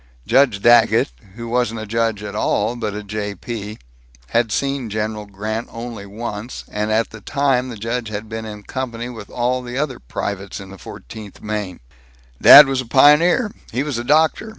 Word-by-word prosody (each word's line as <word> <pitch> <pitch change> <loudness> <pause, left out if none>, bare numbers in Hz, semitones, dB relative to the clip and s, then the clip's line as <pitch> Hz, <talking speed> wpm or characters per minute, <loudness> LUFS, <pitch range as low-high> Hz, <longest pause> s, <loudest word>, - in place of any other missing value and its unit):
Judge 130 -7 +3
Daggett, 120 - +5 0.2
who 115 0 -7
wasn't 120 -1 0
a 110 - -5
judge 115 -1 -1
at 100 -1 -6
all, 105 +2 0
but 110 -4 -4
a 105 - -5
J. 105 0 -4
P., 110 -2 -6 0.5
had 115 -1 +1
seen 135 -1 -1
General 105 0 -3
Grant 110 +3 -4
only 115 -3 -7
once, 110 +2 -6
and 105 +1 -2
at 110 +1 +1
the 110 - -11
time 130 0 0
the 115 - -7
judge 115 +2 -3
had 105 +1 -5
been 110 0 -5
in 105 -1 -8
company 120 0 -5
with 110 -5 -9
all 125 +1 -1
the 125 0 -6
other 140 -2 -2
privates 100 +9 -5
in 95 -1 -10
the 95 - -12
Fourteenth 100 - -11
Maine. 105 -6 -4 0.6
"Dad 145 - +11
was 135 -1 -1
a 125 - -10
pioneer. 150 - +5 0.2
He 125 +4 -1
was 145 -5 -3
a - - -4
doctor. 155 - +2
115 Hz, 185 wpm, -20 LUFS, 105-125 Hz, 0.6 s, Dad